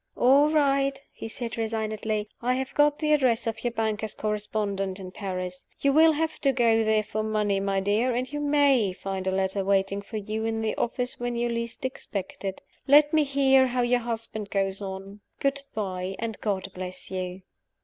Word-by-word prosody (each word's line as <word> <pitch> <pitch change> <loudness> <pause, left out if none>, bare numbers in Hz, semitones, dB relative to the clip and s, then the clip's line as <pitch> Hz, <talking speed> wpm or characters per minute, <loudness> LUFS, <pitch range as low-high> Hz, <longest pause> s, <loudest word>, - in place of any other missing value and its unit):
"All 275 +4 +5
right!" 275 -2 +2
he - - -7
said, 230 0 -5
resignedly. 220 -1 -2
"I 250 +1 +1
have 265 0 -3
got 295 0 +4
the 305 -1 +2
address 255 -6 +2
of 225 -1 -3
your 240 - +1
banker's 220 -2 -2
correspondent 205 -2 -2
in 185 -1 -8
Paris. 185 -2 -4
You 280 0 +2
will 320 +2 +6
have 320 +1 -2
to 275 - +4
go 230 -3 +3
there 215 -1 +2
for 215 +1 -3
money, 210 -2 0
my 195 0 0
dear; 220 +5 +1
and 255 +3 -2
you 295 - -2
may 285 -8 +3
find 190 0 -4
a - - +2
letter 190 +1 0
waiting 195 0 +1
for 215 +2 -7
you 215 +1 -3
in 225 0 -1
the 220 - 0
office 245 +1 -2
when 245 0 -2
you 240 0 0
least 235 +1 -3
expect 200 -8 -5
it. 195 -1 -4 0.2
Let 295 +2 +6
me 310 -1 +5
hear 270 -2 +4
how 250 0 0
your 245 0 +3
husband 225 -3 -4
goes 195 0 -1
on. 195 +1 -7 0.2
Good 275 0 0
by 190 -2 -3
and 225 -2 -4
God 195 -2 -2
bless 185 0 -7
you!" 185 0 -4
220 Hz, 190 wpm, -26 LUFS, 195-260 Hz, 0.2 s, will